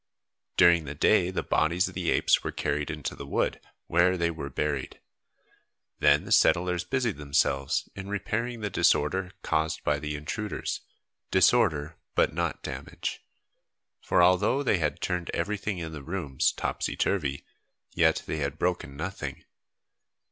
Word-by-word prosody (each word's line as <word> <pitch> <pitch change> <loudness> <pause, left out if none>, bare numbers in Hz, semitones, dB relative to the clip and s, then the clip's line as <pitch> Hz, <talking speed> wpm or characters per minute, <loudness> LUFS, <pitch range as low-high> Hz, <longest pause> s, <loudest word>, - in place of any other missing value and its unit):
During 85 -2 +6
the 70 +1 -6
day 90 +4 +3
the 95 - -2
bodies 85 +4 +2
of - - -8
the - - -2
apes - - +3
were - - -2
carried 75 0 -2
into 75 -3 -4
the 70 - -8
wood, - - 0 0.3
where 90 +2 +3
they 85 -1 +1
were 75 -4 -6
buried; 70 -1 -3 1.0
then - - +4
the - - -8
settlers 90 0 +4
busied 125 - -1
themselves 70 -1 0
in 95 0 -7
repairing 115 +3 -2
the 105 -2 -3
disorder 90 +1 +2
caused 80 0 0
by 75 0 +1
the 75 0 -4
intruders, 100 +9 -4 0.5
disorder 75 +2 +3 0.2
but - - +3
not - - -2
damage, - - -5 0.8
for 90 - +3
although 90 +10 +3
they 105 -8 +2
had 75 -2 -1
turned 90 -1 -2
everything 100 +2 -2
in 80 -2 -5
the 75 -3 -7
rooms 75 -4 0
topsy - - -3
turvy, 75 -8 -1 0.5
yet - - +3
they 80 - -3
had 70 0 -2
broken 80 -6 -2
nothing. 95 +6 -5
85 Hz, 150 wpm, -28 LUFS, 75-95 Hz, 1.0 s, During